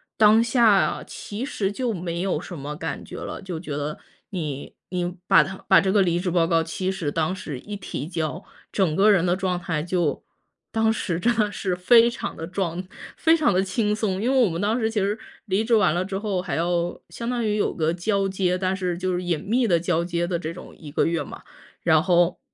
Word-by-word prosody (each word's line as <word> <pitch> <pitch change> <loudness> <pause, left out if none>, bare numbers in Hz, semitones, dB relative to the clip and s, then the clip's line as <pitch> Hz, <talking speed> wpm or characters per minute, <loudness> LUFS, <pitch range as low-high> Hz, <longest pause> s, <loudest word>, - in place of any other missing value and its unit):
当 215 +1 +6
下 230 -4 +3
其 210 +4 -6
实 215 -8 -1
就 245 0 -1
没 170 -2 -3
有 190 -1 0
什 175 - -8
么 145 +2 -5
感 160 +1 -4
觉 - - -9
了， - - -6
就 180 -4 -5
觉 155 -5 -5
得 150 +1 -4 0.3
你 150 -7 -5 0.2
你 180 -1 -1
把 - - +7
它 190 0 -7
把 - - +7
这 190 - +1
个 205 0 +4
离 175 -2 +2
职 180 - -1
报 165 -1 +3
告 165 -1 +3
其 185 +3 -3
实 170 -6 -2
当 165 +4 0
时 145 -8 -6
一 205 +7 -7
提 155 -7 -5
交， 165 -1 -3 0.3
整 180 -6 +1
个 210 +2 +5
人 180 -3 +3
的 175 0 +2
状 185 -2 -1
态 165 -3 -2
就 175 -4 -1 0.5
当 225 0 +2
时 175 -6 -2
真 235 +6 +2
的 210 -1 +2
是 190 -3 -2
非 230 +6 +6
常 - - -5
地 165 - -5
装， 180 0 -3 0.3
非 325 0 +4
常 305 -10 +2
地 185 +1 +3
轻 210 +2 0
松。 200 -3 -1
因 240 - +1
为 270 - +3
我 - - +1
们 165 +1 -3
当 215 +3 +1
时 225 -2 0
其 220 - 0
实 200 +2 0 0.3
离 200 +1 +1
职 230 +1 0
完 205 -8 +4
了 175 +2 0
之 195 0 -4
后 200 -3 -1
还 175 -6 -3
要 175 0 0
相 235 0 -5
当 240 -2 -1
于 210 - +1
有 210 - 0
个 160 0 0
交 195 +2 0
接， 185 -1 0
但 185 0 0
是 180 -2 -2
就 185 0 -1
是 180 0 -2
隐 170 -3 0
秘 235 +5 +1
地 175 -6 +3
交 170 0 0
接 175 0 -1
的 175 -1 -1
这 165 -1 -5
种 180 - -11
1 150 -3 -10
个 - - +2
月 165 -3 0
嘛。 - - -10 0.4
然 160 -2 +4
后 175 -1 +3
185 Hz, 250 characters per minute, -24 LUFS, 170-210 Hz, 0.5 s, 把